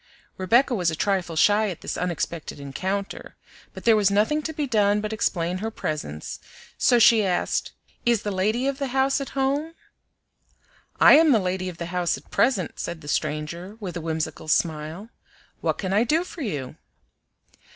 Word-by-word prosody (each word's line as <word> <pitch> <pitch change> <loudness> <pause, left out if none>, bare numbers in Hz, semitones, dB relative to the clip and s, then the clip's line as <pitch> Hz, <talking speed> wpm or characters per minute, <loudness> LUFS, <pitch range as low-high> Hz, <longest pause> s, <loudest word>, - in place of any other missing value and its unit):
Rebecca 240 +8 +3
was 180 -7 +1
a 160 - -2
trifle 185 -3 -1
shy 210 +6 +4
at 180 - -7
this - - -4
unexpected 170 -3 -3
encounter, 190 +8 -4 0.4
but - - -10
there 230 -1 +5
was 205 -2 +3
nothing 215 +10 +2
to 315 - -4
be 300 -1 -2
done 210 -5 +2
but 215 +1 -3
explain 180 -4 -1
her 220 +3 -2
presence, 150 - -5 0.4
so 245 - +4
she 225 -1 +6
asked, 185 -2 -1 0.3
"Is 235 -3 +2
the 205 - -2
lady 215 +7 0
of 275 0 -1
the 275 - -1
house 270 +1 +2
at 275 - -7
home?" 285 +5 0 1.2
"I - - +9
am 320 -1 +5
the 240 - +6
lady 185 -1 -2
of 175 - -9
the 170 - -4
house 175 -4 0
at 135 - -18
present," 215 -9 +1
said 170 -2 -5
the 145 - -12
stranger, 170 +8 -3
with 185 -5 -6
a 170 - -4
whimsical 160 -1 -4
smile. 160 +6 -1 0.5
"What - - -1
can 190 -1 -2
I 210 +3 +4
do 315 +8 +1
for 360 -2 -9
you?" 145 - -4
200 Hz, 180 wpm, -24 LUFS, 170-235 Hz, 1.2 s, I